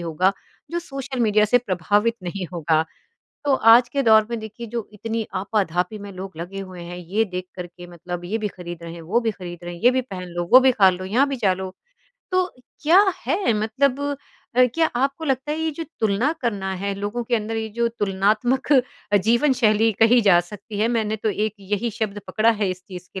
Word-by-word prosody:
होगा, 170 +3 +1 0.4
जो 340 - -1
social 275 -6 -5
media 215 -2 +4
से 245 +4 +4
प्रभावित 205 +2 0
नहीं 185 +1 -4
होगा। 160 -2 +1 0.6
तो 285 -2 +3 0.2
आज 240 +1 +6
के 280 +2 -1
दौर 220 -3 +5
में 235 - -2
देखिए 220 +2 -8
जो 235 -3 -3
इतनी 225 +1 -3
आपा-धापी 190 0 -1
में 205 0 -8
लोग 185 -2 -8
लगे 180 +4 -6
हुए 185 -2 -9
हैं, 175 +1 -7
ये 185 +6 -1
देख 185 -2 -5
कर 180 - -5
के 175 0 -13
मतलब 175 0 -7
ये 215 +5 -2
भी 215 -1 -2
खरीद 175 -3 -9
रहे 165 0 -7
हैं, 170 - -9
वो 190 +9 0
भी 230 -2 0
खरीद 175 -3 -8
रहे 175 0 -6
हैं, 170 - -11
ये 245 - +7
भी 260 0 +1
पहन 190 -8 -7
लो, 175 0 -3
वो 255 - +10
भी 260 0 +5
खा 195 -5 +5
लो, 185 +1 -5
यहाँ 235 +9 +2
भी 275 - -2
जा 205 -6 +2
लो। 190 0 -5 0.6
तो 370 0 +2 0.4
क्या 330 +5 +6 0.3
है? 370 - +1
मतलब 255 +5 +1 0.6
अ, 255 - +7
क्या 330 -1 +3
आपको 275 +5 -1
लगता 270 0 -1
है 310 - -3
ये 320 0 0
जो 330 - -4 0.2
तुलना 220 +7 +2
करना 200 -6 -2
है, 200 0 -1
लोगों 205 +4 -3
के 240 - 0
अंदर 220 +1 -3
ये 220 0 -2
जो 235 - +3
तुलनात्मक 215 +8 +1
अ, 250 -6 +1
जीवन 235 +8 +3
शैली 220 0 +4
कही 235 +2 +6
जा 195 -5 +5
सकती 205 +3 -9
है, 220 +2 +2
मैंने 220 -2 0
तो 220 - -2
एक 210 +1 -1
यही 205 +4 -2
शब्द 210 -2 -2
पकड़ा 220 +1 +3
है 210 -3 0
इस 185 0 -6
चीज़ 180 -1 -9
के 190 - -4
210 Hz, 220 wpm, -22 LUFS, 185-240 Hz, 0.6 s, वो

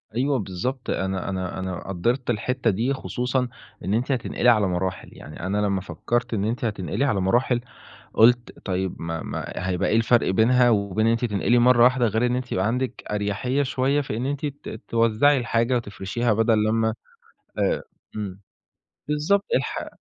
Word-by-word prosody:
أيوة 135 +1 +1
بالضبط. 105 +8 -4
أنا 95 0 -2
أنا 95 -1 -3
أنا 95 -1 -5
قدّرت 120 +8 -1
الحتّة 120 +1 0
دي 115 +8 0
خصوصًا 125 -1 -1 0.4
إن 100 - 0
أنتِ 125 +5 0
هتنقلي 125 -1 +1
على 105 -4 +4
مراحل. 90 +1 -3
يعني 75 - -11
أنا 95 +4 -2
لمّا 100 -2 +1
فكّرت 115 +7 -2
إن 100 -2 0
أنتِ 120 +2 -2
هتنقلي 105 +6 -1
على 105 -8 +1
مراحل، 120 +5 +2 0.5
قُلت 120 +2 +3
طيب 95 -1 -2
ما 80 0 -3
ما - - -4 0.2
هيبقى 90 0 0
إيه 110 - +2
الفرق 115 -1 +3
بينها 120 +5 +4
وبين 105 0 +1
إن 115 - +4
أنتِ 115 +1 +1
تنقلي 115 +3 +2
مرّة 120 -1 +5
واحدة 125 -1 +4
غير 110 +3 +1
إن 125 0 +1
أنتِ 125 -1 -4
يبقى 95 +3 +1
عندك 125 +2 -2
أريّحية 105 +7 0
شوية 135 +2 +1
في 110 -5 -4
إن 125 - -2
أنتِ 145 +1 -2
ت 140 -6 -7
توزّعي 115 +5 +3
الحاجة 115 +1 +1
وتفرشيها 110 +1 -1
بَدَل 110 0 +3
لمّا 110 0 +1 0.7
آآ - - +1 0.3
إمم. 100 -2 -5 0.7
بالضبط. 155 +7 +1
الح - - -2
115 Hz, 170 wpm, -24 LUFS, 100-125 Hz, 0.7 s, مرّة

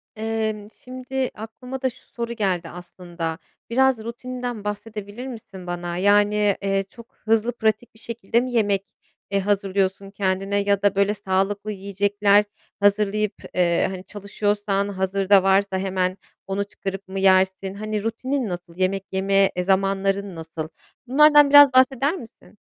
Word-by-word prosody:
Emm, 220 -1 -3
şimdi 255 +1 -4
aklıma 250 +4 -8
da 260 - +1
şu 240 - -18
soru 235 0 -4
geldi 185 -6 -1
aslında. 175 -2 -6 0.3
Biraz 265 +1 +3
rutininden 245 -1 -5
bahsedebilir 210 +3 -6
misin 195 -7 -10
bana? 175 0 -4
Yani, 205 +1 +3
eee, 195 0 0
çok 235 +2 -15
hızlı, 225 +1 +2
pratik 220 +1 0
bir 220 - -19
şekilde 230 0 -1
mi 255 0 -4
yemek, 205 -4 +1 0.5
eee, 200 - +2
hazırlıyorsun 195 -1 -1
kendine 195 0 -1
ya 200 -1 +1
da 200 -1 +2
böyle 200 +1 +2
sağlıklı 200 +1 -1
yiyecekler 200 +1 +2 0.3
hazırlayıp, 205 +1 +2 0.2
eee, 175 -2 +2
hani, 185 -1 -7
çalışıyorsan 205 0 -1
hazırda 195 0 +2
varsa 195 0 +2
hemen 185 -1 -1 0.3
onu 195 +1 -1
çıkarıp 195 -1 -7
mı 190 +1 -4
yersin? 190 0 +3
Hani, 215 0 -4
rutinin 255 +2 -2
nasıl? 175 -1 -7
Yemek 190 +1 -1
yeme, 195 0 +2
eee, 180 - -1
zamanların 195 0 0
nasıl? 160 -1 -6 0.4
Bunlardan 295 +2 +6
biraz 290 -1 +8
bahseder 265 +3 +4
misin? 225 - -13
200 Hz, 140 wpm, -23 LUFS, 190-225 Hz, 0.5 s, biraz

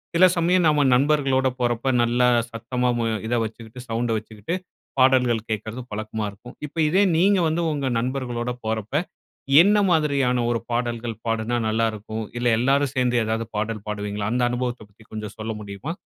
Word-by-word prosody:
சில 185 +2 +7
சமயம் 175 +1 +3
நம்ம 150 -2 +3
நண்பர்களோட 135 -1 +2
போறப்ப 120 +1 0 0.2
நல்லா 120 +1 +2 0.2
சத்தமா 125 +2 -2
மு 115 - 0 0.2
இத 120 - 0
வச்சுக்கிட்டு, 115 +2 -8
சவுண்டை 115 +1 0
வச்சுக்கிட்டு 110 - -5 0.4
பாடல்கள் 125 -4 +3
கேட்கிறது 110 +3 -4
பழக்கமா 110 +1 -4
இருக்கும். 110 +5 -13
இப்ப 145 - -17
இதே 190 +5 +4
நீங்க 195 +2 +4
வந்து 160 +2 0
உங்க 140 -2 -2
நண்பர்களோட 125 -1 -2
போறப்ப 110 +3 -3 0.7
என்ன 205 +4 +4
மாதிரியான 140 -6 +2
ஒரு 115 - 0
பாடல்கள் 120 -1 -2
பாடுனா 115 +1 0
நல்லாருக்கும்? 110 0 -2
இல்ல 120 0 0
எல்லாரும் 135 +2 +2
சேர்ந்து 125 -1 +1
எதாவது 110 +1 -1
பாடல் 110 0 -3
பாடுவீங்களா? 105 -1 -3
அந்த 125 +1 0
அனுபவத்தைப் 120 -3 -3
பத்தி 110 +2 -20
கொஞ்சம் 105 -1 -6
சொல்ல 110 +1 -3
முடியுமா? 100 +8 -6
120 Hz, 155 wpm, -23 LUFS, 110-135 Hz, 0.7 s, சில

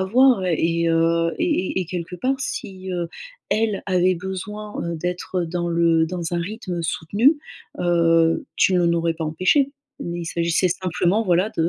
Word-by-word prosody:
avoir. 235 +2 +4
Et, 170 0 +1
heu, 165 0 +2
et 305 - 0
et - - +1
et - - -9
quelque 180 0 -5
part 265 +8 -1
si, 190 -7 -5
heu, 175 -2 -2 0.4
elle 215 -2 0
avait 185 -1 +2
besoin, 200 +4 -6
heu, 170 0 -3
d'être 180 +2 -3
dans 175 +1 -2
le 165 -1 +3
dans 175 -1 -4
un 170 - 0
rythme 180 -2 -4
soutenu, 210 - +2 0.4
heu, 165 -2 +3
tu 185 - +4
l'en 170 -1 +3
aurais 165 0 0
pas 165 - -5
empêché. 185 - +2 0.3
Mais 175 0 -4
il - - -5
s'agissait 170 +2 +1
simplement, 185 +3 0
voilà, 185 +1 +2
de 165 0 +3
175 Hz, 170 wpm, -22 LUFS, 170-190 Hz, 0.4 s, avoir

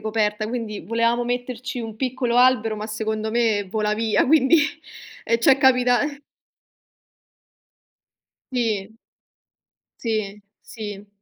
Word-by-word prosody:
coperta, 215 -1 -1
quindi 225 -4 -4
volevamo 230 +2 0
metterci 245 0 -4
un 225 -2 -7
piccolo 250 -1 -1
albero, 245 -3 +4
ma 210 - -5
secondo 220 0 -3
me 220 -3 +1
vola 210 +2 -1
via, 220 0 +1
quindi 305 +2 +5 0.7
e 230 - +3
ci 230 - +5
è 270 - +5
capita 250 -2 +4 2.5
Sì. 220 -6 -1 1.1
Sì, 215 -3 -3 0.2
sì. 210 -2 -8
225 Hz, 105 wpm, -22 LUFS, 215-245 Hz, 2.5 s, quindi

